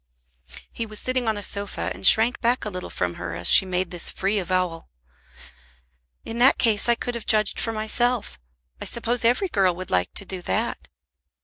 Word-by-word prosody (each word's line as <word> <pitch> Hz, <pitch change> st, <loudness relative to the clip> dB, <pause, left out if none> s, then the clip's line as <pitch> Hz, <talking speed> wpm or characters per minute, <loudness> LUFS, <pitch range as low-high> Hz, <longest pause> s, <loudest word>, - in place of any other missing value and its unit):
He 230 Hz, -, -6 dB
was 215 Hz, -1 st, -1 dB
sitting 255 Hz, -2 st, -1 dB
on 220 Hz, -1 st, 0 dB
a 205 Hz, -, -6 dB
sofa 200 Hz, -, -2 dB
and 95 Hz, +2 st, +3 dB
shrank 225 Hz, +3 st, +5 dB
back 240 Hz, 0 st, 0 dB
a 210 Hz, -, -5 dB
little 180 Hz, -1 st, -7 dB
from 90 Hz, -1 st, -3 dB
her 85 Hz, -2 st, -5 dB
as 85 Hz, 0 st, +2 dB
she 190 Hz, -, +8 dB
made 180 Hz, -1 st, -2 dB
this 175 Hz, -1 st, -2 dB
free 200 Hz, +2 st, -2 dB
avowal. 180 Hz, -2 st, -3 dB, 1.4 s
"In 230 Hz, +1 st, -6 dB
that 260 Hz, +3 st, +6 dB
case 225 Hz, -1 st, +2 dB
I 235 Hz, -, +5 dB
could 245 Hz, +1 st, -5 dB
have 235 Hz, -2 st, -8 dB
judged 215 Hz, -2 st, +3 dB
for 225 Hz, -, -2 dB
myself. 225 Hz, -, -2 dB, 0.4 s
I -, -, -5 dB
suppose 235 Hz, +1 st, -2 dB
every 245 Hz, -, +2 dB
girl 190 Hz, -, +1 dB
would 185 Hz, +1 st, -9 dB
like 90 Hz, -1 st, 0 dB
to 200 Hz, -, -3 dB
do 185 Hz, -1 st, -7 dB
that." -, -, -3 dB
210 Hz, 195 wpm, -23 LUFS, 180-235 Hz, 1.4 s, she